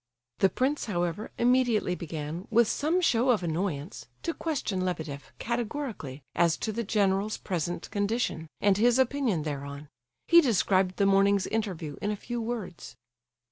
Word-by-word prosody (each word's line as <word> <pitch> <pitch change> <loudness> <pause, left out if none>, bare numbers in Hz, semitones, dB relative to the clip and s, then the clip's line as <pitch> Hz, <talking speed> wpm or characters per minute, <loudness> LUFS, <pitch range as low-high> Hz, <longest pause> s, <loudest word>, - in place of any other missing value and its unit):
The 195 - +5
prince, 270 +7 0
however, 175 0 -2
immediately 240 -6 +3
began, 160 +1 -5
with 235 0 +4
some 320 +10 +1
show 250 -6 +3
of 220 -7 +3
annoyance, 165 0 -3 0.2
to 335 - -1
question 255 - -2
Lebedeff 160 -6 -4
categorically, 230 - -4
as 170 -1 +3
to 220 - -2
the 235 +2 -2
general's 200 0 +1
present 175 -2 -3
condition, 205 -5 -1
and 200 -1 +3
his 240 +3 +4
opinion 260 - +1
thereon. 140 -1 -5 0.4
He 340 0 +8
described 190 - +2
the 200 - +2
morning's 195 0 +4
interview 185 -9 -3
in 205 - -1
a 210 - 0
few 240 +3 -5
words. 220 -7 -5
200 Hz, 145 wpm, -28 LUFS, 170-235 Hz, 0.4 s, He